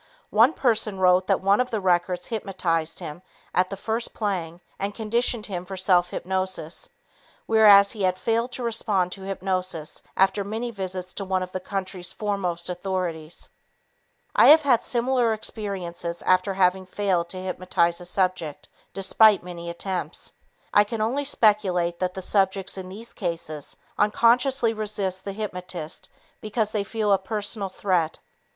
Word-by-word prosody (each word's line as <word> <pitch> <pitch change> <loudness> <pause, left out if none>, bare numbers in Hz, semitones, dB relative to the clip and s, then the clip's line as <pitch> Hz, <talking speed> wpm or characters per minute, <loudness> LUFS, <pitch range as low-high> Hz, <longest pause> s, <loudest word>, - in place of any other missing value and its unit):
One 230 +8 +5
person 225 -7 0
wrote 185 0 +4
that 195 - +2
one 200 +4 +4
of 250 - -2
the 220 - -1
records 180 -1 +1
hypnotized 175 -7 -2
him 165 -1 -6 0.3
at 185 0 +2
the 195 - -5
first 225 +4 -3
playing 175 -6 -2 0.2
and 200 +1 -3
conditioned 230 0 0
him 180 -4 -4
for 190 +1 -7
self 180 -1 +3
hypnosis, 185 -3 -3 0.6
whereas 205 -3 +7
he 210 - -6
had 185 -1 +2
failed 230 +4 0
to 250 - -4
respond 210 -6 0
to 195 - -7
hypnosis 185 -4 -3 0.2
after 195 +1 +3
many 225 +4 -4
visits 185 -3 -5
to 200 - -4
one 190 -1 0
of 185 - -8
the 185 - -3
country's 185 -2 -4
foremost 185 -5 -2
authorities. 175 -3 -4 0.9
I - - +7
have 310 +1 +8
had 255 -5 +3
similar 245 -1 +1
experiences 180 -6 -5
after 185 +1 +2
having 185 0 +2
failed 185 -3 0
to 185 - -6
hypnotize 180 -2 0
a - - -8
subject 180 -5 -1 0.3
despite 200 +1 +5
many 170 -1 -7
attempts. 180 +2 -4 0.4
I 205 - +7
can 215 +1 -4
only 260 +6 0
speculate 190 -9 +2
that 180 -1 -2
the 190 - -5
subjects 195 -1 +1
in 185 -1 -6
these 220 +5 -8
cases 165 -5 -4 0.2
unconsciously 235 +3 +3
resist 205 -3 -2
the 200 - -3
hypnotist 180 -6 -5 0.3
because 215 0 -1
they 210 -2 -1
feel 210 0 0
a 195 - +3
personal 205 0 -3
threat. 180 -4 0
190 Hz, 155 wpm, -25 LUFS, 180-215 Hz, 0.9 s, have